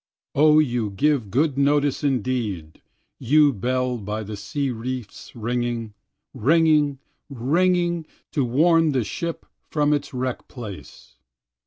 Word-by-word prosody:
O 150 +1 +5
you 120 -8 +1
give 125 +2 +1
good 140 +4 +1
notice 145 0 +2
indeed, 115 - -2 0.4
you 145 +3 +4
bell 125 +3 -1
by 105 +1 -4
the 105 +1 -6
sea 140 +6 -3
reefs 120 -1 -6
ringing, 120 -1 -2 0.4
Ringing, 150 +1 +3 0.3
ringing, 170 +5 +1 0.2
to 140 - 0
warn 160 +5 +3
the 130 -3 +1
ship 165 - -5 0.2
from 150 -1 +2
its 145 -1 -2
wreck 130 -1 -4
place. 100 - -10
130 Hz, 120 wpm, -23 LUFS, 115-150 Hz, 0.4 s, O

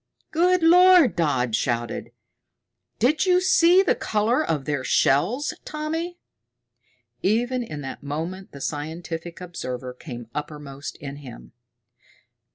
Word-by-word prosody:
"Good 355 +2 +3
Lord," 360 -3 +7
Dodd 130 -9 +1
shouted, 120 -1 -2 0.9
"did 300 - +2
you 360 0 +5
see 365 0 +5
the 390 - +3
color 225 +7 0
of 150 - -2
their 145 -3 -2
shells, 205 - +2
Tommy?" 320 +3 -4 1.0
Even 245 +5 +1
in 155 -11 -6
that 135 - -7
moment 165 +7 -5
the 140 - -11
scientific 165 +3 -5
observer 130 -8 -6
came 120 -3 -9
uppermost 145 -2 -6
in 140 -1 -7
him. 130 -5 -11
170 Hz, 115 wpm, -24 LUFS, -, 1.0 s, Lord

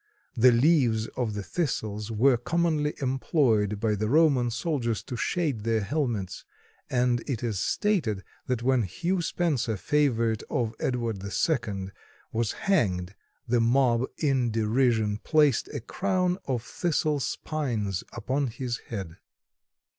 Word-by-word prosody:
The 125 +2 +6
leaves 120 -4 +3
of 115 -4 -3
the 105 - -3
Thistles 105 - -2
were 125 +4 +4
commonly 155 +3 0
employed 125 - +1
by 110 -1 +1
the 105 +1 -1
Roman 140 -4 +4
soldiers 120 -2 -1
to 125 - -6
shade 145 -2 -1
their 115 -1 +1
helmets, 110 - -2 0.5
and 125 -1 +2
it 125 -3 -2
is 110 -5 -1
stated 130 - 0 0.2
that 125 -2 -1
when 130 -1 +3
Hugh 175 - -1
Spencer, 145 - 0
favorite 115 -4 +1
of 115 -2 -1
Edward 115 -6 -2
II, 100 - -1 0.4
was 115 -1 0
hanged, 95 - 0 0.3
the 120 0 +2
mob, 120 0 +3
in 135 -5 +1
derision, 110 -1 +1
placed 150 -3 +3
a 145 - -5
crown 185 - 0
of 125 -4 -2
thistle 155 -1 0
spines 120 - -2
upon 130 +4 -1
his 120 +1 -4
head. 95 -7 -6
120 Hz, 130 wpm, -27 LUFS, 110-145 Hz, 0.5 s, The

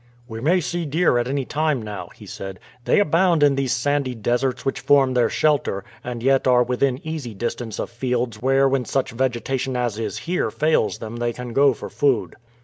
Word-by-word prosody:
"We 115 -2 -7
may 175 +7 +3
see 170 +1 -3
deer 155 -4 +2
at 120 - -1
any 135 0 -1
time 155 -1 0
now," 105 -2 -6
he - - -13
said. 95 -1 -7 0.3
"They - - +4
abound 170 -3 +3
in 145 -1 +5
these 135 -2 -1
sandy 130 +1 0
deserts 120 +3 -1
which 135 - -1
form 135 -2 +4
their 125 -1 +3
shelter, 145 -10 +1 0.2
and 120 -1 -5
yet 135 0 +3
are 125 -1 +5
within 125 +1 0
easy 150 -9 -5
distance 120 +1 -4
of - - -4
fields 120 -2 -2
where 135 +2 +3
when 135 -2 0
such 135 +1 -1
vegetation 130 +1 -1
as 120 -3 -1
is 110 -3 -3
here 180 +2 -1
fails 155 -7 +1
them 115 +1 -7
they 120 0 -1
can 125 -1 -7
go 140 -1 +4
for - - -7
food." 140 -6 +1
130 Hz, 200 wpm, -22 LUFS, 120-145 Hz, 0.3 s, in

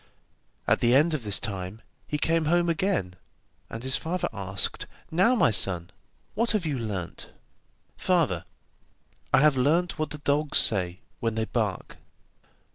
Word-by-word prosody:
At - - +3
the 120 +1 +4
end 155 +4 +4
of 155 - -1
this 105 -2 +1
time, 100 +1 -5 0.2
he 150 - -2
came 165 +1 +1
home 175 +2 +2
again, 165 - 0 0.6
and 115 +1 -7
his 130 +1 +1
father 180 +3 -2
asked: 100 -1 -2 0.2
'Now, 190 +10 +4
my 215 - +4
son, 90 -4 0 0.4
what 230 +1 +1
have 205 -6 0
you 145 -5 -1
learnt?' 100 -6 -5 0.7
'Father, - - +1 0.9
I - - +5
have 150 -1 +5
learnt 160 +8 +1
what 155 - -1
the 150 - -6
dogs 145 +1 +1
say 90 -4 +2 0.2
when 115 -1 -1
they 110 0 0
bark. 110 -5 -3
135 Hz, 150 wpm, -27 LUFS, 105-165 Hz, 0.9 s, I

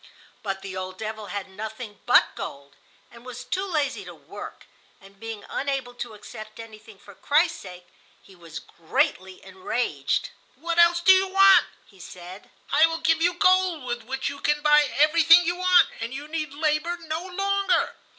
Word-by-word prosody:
But 195 -2 -5
the 190 -1 -7
old 185 0 -6
devil 220 0 -6
had 200 -1 -5
nothing 215 +2 -8
but 245 - +4
gold, 140 0 -9 0.4
and 235 0 -15
was 250 0 -9
too 365 +10 -3
lazy 300 -6 -2
to - - -10
work; - - -11 0.3
and 195 0 -19
being 225 -1 -8
unable 270 -3 -3
to 240 -2 -7
accept 215 +1 -11
anything 220 -2 -12
for 200 +1 -16
Christ's 325 - +1
sake, 180 -2 -12 0.3
he 190 - -19
was 165 -3 -11
greatly 185 +3 -3
enraged. 185 - -2 0.3
"What 335 +5 -3
else 340 0 +5
do 380 - +6
you 380 0 +4
want?" 390 0 +6 0.2
he 195 - -22
said. 180 +2 -11 0.2
"I 310 +3 +5
will 330 0 -3
give 325 0 +2
you 350 +1 +2
gold 370 -4 +2
with 240 -1 -4
which 265 +3 -4
you 280 0 -5
can 295 +1 0
buy 300 0 +5
everything 330 +3 +6
you 350 +1 0
want, 365 0 +4
and 230 +1 -5
you 285 +3 -7
need 310 -2 -4
labor 305 +3 -1
no 320 +1 -4
longer." 395 +2 0
260 Hz, 175 wpm, -24 LUFS, 205-330 Hz, 0.4 s, do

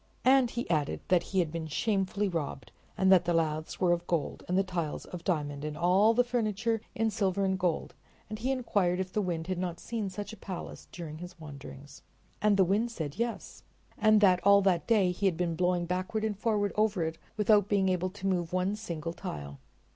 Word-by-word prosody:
And 260 -1 +5
he 240 0 -4
added 155 -4 0
that 180 -2 +4
he 190 - -5
had 170 -4 +2
been 165 -1 -4
shamefully 200 +4 0
robbed, 155 -7 -4 0.3
and 190 0 +4
that 180 -2 +6
the 175 - +1
laths 155 -1 -1
were 180 -2 +3
of 175 0 0
gold 165 -5 -2
and 180 - +1
the 195 - +4
tiles 175 -5 -3
of 180 -2 -8
diamond, 145 -5 -2
and 150 0 -4
all 190 +7 +4
the 245 - +5
furniture 225 -2 -1
in 225 0 +1
silver 195 -2 0
and 190 0 0
gold, 180 -3 -1 0.3
and 215 0 -6
he 250 +4 -1
inquired 200 -8 +1
if 185 -1 -3
the 210 - +1
Wind 170 -4 -2
had 185 0 -3
not 175 -2 -3
seen 220 -4 -3
such 205 +3 -6
a - - -10
palace 185 -3 -7
during 160 -3 -7
his 180 0 -10
wanderings. 140 -1 -10 0.4
And 210 -1 +4
the 190 - +6
Wind 210 +6 +1
said 160 -5 -5
yes, 235 0 -3 0.3
and 215 -1 +4
that 185 -3 +5
all 200 0 +6
that 180 -3 +2
day 205 -6 +4
he 195 +3 0
had 175 -4 0
been 170 -2 -1
blowing 180 0 +1
backward 185 +5 -2
and 215 -1 -1
forward 205 -1 0
over 210 -4 +2
it 160 0 -4 0.2
without 210 -1 +4
being 200 -2 +2
able 185 0 0
to 195 0 -9
move 180 -3 0
one 185 +3 0
single 170 -6 -5
tile. 70 - -7
185 Hz, 215 wpm, -30 LUFS, 170-210 Hz, 0.4 s, that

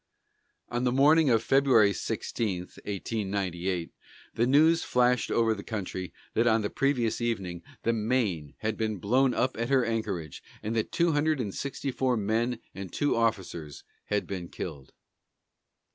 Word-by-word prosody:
On 120 +1 -1
the 125 - +2
morning 145 +3 +5
of 115 -2 +3
February 125 -7 +4
16, 95 +1 -2
1898, 95 -3 -3 0.4
the 120 - +1
news 160 +5 +5
flashed 125 -1 +2
over 115 -1 +2
the 100 -2 -7
country 95 -4 -4 0.2
that 115 +2 +2
on 110 -1 +3
the 105 - -2
previous 125 -5 0
evening 95 -7 -2 0.2
the 115 - +2
Maine 105 - -1
had 110 0 -1
been 110 -2 -1
blown 125 +7 +2
up 130 +1 +1
at 115 - -1
her 135 -3 +3
anchorage, 105 -9 -3 0.2
and 110 +2 -2
that 110 - -1
two 170 -1 +2
hundred 155 0 +1
and 105 -6 -3
sixty 140 0 -3
four 130 -1 +1
men 115 +4 0 0.2
and 95 -3 -7
two 145 - +1
officers 95 -10 -2 0.2
had 105 -1 -1
been 90 -3 -5
killed. 65 -2 -7
115 Hz, 155 wpm, -28 LUFS, 100-125 Hz, 0.4 s, morning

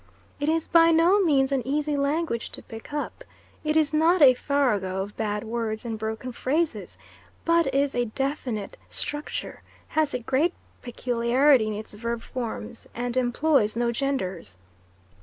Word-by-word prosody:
It 290 +1 0
is 325 0 +1
by 330 0 +5
no 335 +5 +5
means 280 -6 +3
an 270 -2 +1
easy 295 +3 -1
language 280 -3 -1
to - - -6
pick 225 +4 -10
up 295 +11 -4 0.4
it 305 0 +1
is 310 -1 +2
not 330 +4 +4
a 270 -4 +8
farrago 215 -9 0
of 205 +1 -10
bad 210 -1 -2
words 225 -1 -3
and 225 -2 -4
broken 220 +3 -4
phrases, 305 +7 -1 0.5
but 335 -4 +3
is 275 +1 +1
a 245 0 +1
definite 250 -3 -3
structure, 295 0 -4 0.3
has 310 -3 +1
a - - -1
great 265 +8 +1 0.3
peculiarity 245 +1 +2
in 215 - -2
its 210 +1 -7
verb 235 +2 -4
forms, 235 -2 -6
and 245 0 -3
employs 255 -2 +2
no 235 0 +1
genders. 190 - -3
255 Hz, 155 wpm, -26 LUFS, 225-300 Hz, 0.5 s, a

